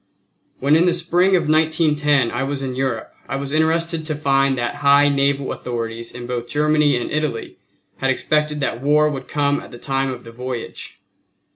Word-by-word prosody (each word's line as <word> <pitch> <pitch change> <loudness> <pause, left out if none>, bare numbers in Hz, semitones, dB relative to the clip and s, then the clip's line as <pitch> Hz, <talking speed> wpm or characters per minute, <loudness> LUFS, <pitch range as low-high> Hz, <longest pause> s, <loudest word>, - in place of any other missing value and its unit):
When 140 +3 +3
in 170 +3 +4
the 175 - +3
spring 175 +2 +2
of 175 - +1
1910 150 -4 +2
I 120 - -2
was 135 0 -2
in 130 -1 -3
Europe 130 -3 -3 0.2
I 135 - -2
was 140 0 -4
interested 160 +1 +1
to 155 -1 -2
find 135 -2 +2
that 120 -1 -2
high 145 0 +5
naval 140 -1 +1
authorities 115 -1 -5
in 120 0 -8
both 120 -1 -4
Germany 150 -1 +2
and 120 - -4
Italy 150 -6 -3 0.4
had 135 - 0
expected 150 +3 0
that 120 -3 -2
war 150 +2 +3
would 135 -3 -6
come 145 -1 0
at - - -11
the 120 - -10
time 135 +1 -1
of 125 -1 -6
the 115 - -11
voyage. 125 0 -7
140 Hz, 185 wpm, -20 LUFS, 130-150 Hz, 0.4 s, high